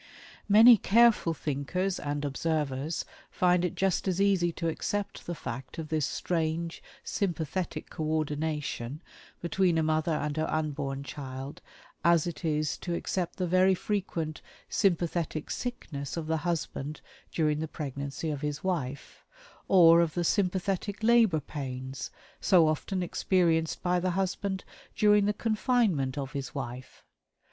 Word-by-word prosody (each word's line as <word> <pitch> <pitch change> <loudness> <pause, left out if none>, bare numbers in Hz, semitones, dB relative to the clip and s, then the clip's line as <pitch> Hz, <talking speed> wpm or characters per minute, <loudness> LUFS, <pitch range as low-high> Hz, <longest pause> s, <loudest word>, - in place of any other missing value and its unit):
Many 225 +3 +9
careful 220 -6 +4
thinkers 160 +7 -2
(and 145 0 -3
observers) 150 0 -1 0.2
find 180 -1 +2
it 180 - -1
just 195 0 0
as 185 -1 0
easy 195 -4 +3
to 165 - -3
accept 205 +5 -3
the 175 - -3
fact 125 -1 -7
of 160 -2 -5
this 155 -3 +1
strange 165 -1 -2 0.2
"sympathetic 175 -2 -3
co 155 - -4
ordination" 150 -2 -2 0.4
between 175 -1 +2
a 160 - +2
mother 155 +1 +1
and 150 0 -2
her 155 +1 0
unborn 145 -3 -2
child 135 -1 -7 0.4
as 170 -2 +4
it 175 +1 -5
is 155 -2 0
to 175 -2 -3
accept 180 0 -2
the 185 - -1
very 185 +2 +4
frequent 175 -6 -3 0.3
"sympathetic 170 -5 0
sickness" 145 - -4
of 165 - -3
the 160 +1 0
husband 155 -3 -3 0.3
during 150 -2 +1
the 160 - -2
pregnancy 140 +1 -4
of 145 -2 -4
his 150 -1 -3
wife 145 -8 -3 0.4
or 170 -3 +7
of 165 -2 0
the 175 - 0
"sympathetic 195 +2 0
labor 225 -8 +5
pains" 130 -2 -6 0.3
so 175 -5 +5
often 180 +4 -1
experienced 170 -3 +1
by 180 0 +2
the 185 +1 0
husband 190 0 -1 0.3
during 210 -1 +5
the 205 - +3
confinement 210 - +1
of 135 -2 -3
his 140 -3 -5
wife. 130 -1 -7
165 Hz, 140 wpm, -29 LUFS, 150-185 Hz, 0.4 s, Many